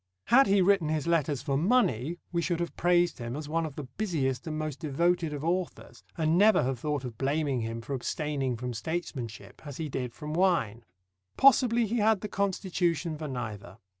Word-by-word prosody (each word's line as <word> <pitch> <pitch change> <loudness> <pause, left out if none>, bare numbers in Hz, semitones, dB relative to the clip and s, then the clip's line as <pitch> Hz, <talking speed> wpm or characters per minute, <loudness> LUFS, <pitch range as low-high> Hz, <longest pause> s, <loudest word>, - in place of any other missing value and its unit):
Had 270 +3 +6
he 195 -1 +4
written 185 -5 +3
his 155 -1 -1
letters 150 -6 0
for 140 - -1
money 170 - +1
we 170 -1 0
should 170 0 -1
have 170 - -3
praised 175 -2 +2
him 120 +1 -5
as 150 0 -6
one 165 +1 -1
of 145 - -10
the 150 - -5
busiest 135 - -2
and 155 -1 -3
most 155 -2 -4
devoted 170 +2 0
of 145 -1 -5
authors, 175 +2 -3
and 160 +1 +2
never 215 - +5
have 130 -1 -2
thought 145 -1 -2
of 115 -3 -8
blaming 140 -2 0
him 115 +1 -4
for 130 +5 -6
abstaining 135 -1 -2
from 125 +1 -4
statesmanship 125 -4 -5
as 145 -3 -8
he 160 -2 -4
did 125 -3 -4
from 150 -1 -6
wine. 165 - +1 0.5
Possibly 240 -3 +5
he 225 +3 -1
had 215 -1 +3
the 210 - -3
constitution 180 -4 -1
for 155 0 -5
neither. 105 -8 -6
155 Hz, 195 wpm, -29 LUFS, 130-175 Hz, 0.5 s, Had